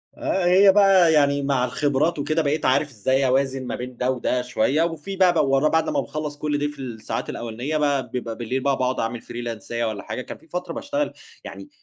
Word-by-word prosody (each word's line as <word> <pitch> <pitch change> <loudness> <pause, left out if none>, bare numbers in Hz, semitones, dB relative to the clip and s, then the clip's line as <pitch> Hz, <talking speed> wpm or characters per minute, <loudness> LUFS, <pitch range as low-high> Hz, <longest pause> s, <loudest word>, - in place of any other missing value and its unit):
آه. 190 -2 -1
هي 190 +3 +6
بقى 195 -4 +5
يعني 140 -2 +3
مع 135 -3 +1
الخبرات 145 +5 0
وكده، 155 +3 0
بقيت 150 +1 -1
عارف 130 +3 +2
إزاي 130 +3 0
أوازن 135 0 0
ما - - -3
بين 125 0 -7
ده 125 +1 +1
وده 125 0 -1
شوية 125 +5 +1
وفي 165 +3 -4
بقى 185 -2 +4
بو 140 -5 +2
ورا 145 +3 +3
بعد 160 +1 +1
لمّا - - 0
باخلّص 150 -1 -4
كل 150 0 -1
ده 145 0 0
في 145 - -16
الساعات 115 -4 -5
الأولانية 120 +6 -3
بقى، 145 -3 0
بيبقى 120 -3 -4
بالليل 125 +3 -2
بقى 140 -1 +1
باقعد 130 0 -1
أعمل 115 +1 -2
فريلانساية 120 0 -4
والّا 110 -2 -4
حاجة. - - -5
كان - - -8
في - - -23
فترة 180 0 -5
باشتغل 290 - -2 0.3
يعني 295 - -9
140 Hz, 215 wpm, -23 LUFS, 125-160 Hz, 0.3 s, هي